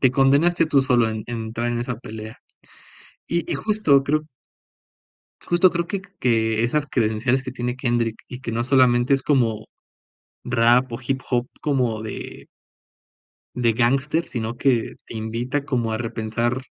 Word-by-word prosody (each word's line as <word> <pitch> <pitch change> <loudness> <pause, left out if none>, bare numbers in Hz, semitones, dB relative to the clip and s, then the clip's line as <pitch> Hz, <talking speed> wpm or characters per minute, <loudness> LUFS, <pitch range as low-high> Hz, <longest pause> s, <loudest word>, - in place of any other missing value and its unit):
te 130 - +5
condenaste 140 +6 +3
tú 145 -3 +3
solo 125 -4 +3
en 110 -1 -4
entrar 115 0 -3
en 120 0 -1
esa 120 -1 -3
pelea. 110 -2 -9 0.9
Y 170 0 -1
y - - 0
justo 205 -11 +3
creo 155 +3 0 1.2
justo 175 +1 +4
creo 170 0 -2
que 200 - -3 0.2
que 115 -2 +1
esas 145 +5 +1
credenciales 120 +3 0
que 130 - -5
tiene 125 -1 -3
Kendrick, 120 -3 -1
y 125 - -8
que 125 -3 -5
no 115 +1 -1
solamente 125 0 +4
es 135 - +2
como, 115 -7 +1 0.8
rap, 120 +1 +3
o 115 - -5
hip 135 -1 0
hop 125 0 0
como 125 -7 0
de 110 - -7 1.1
de 120 -2 +2
gángster, 135 +7 +1
sino 115 -1 -4
que 125 -4 +1
te - - -9
invita 115 +6 -2
como 120 -5 -1
a 110 - -1
repensar 115 +2 -2
125 Hz, 155 wpm, -22 LUFS, 115-135 Hz, 1.2 s, te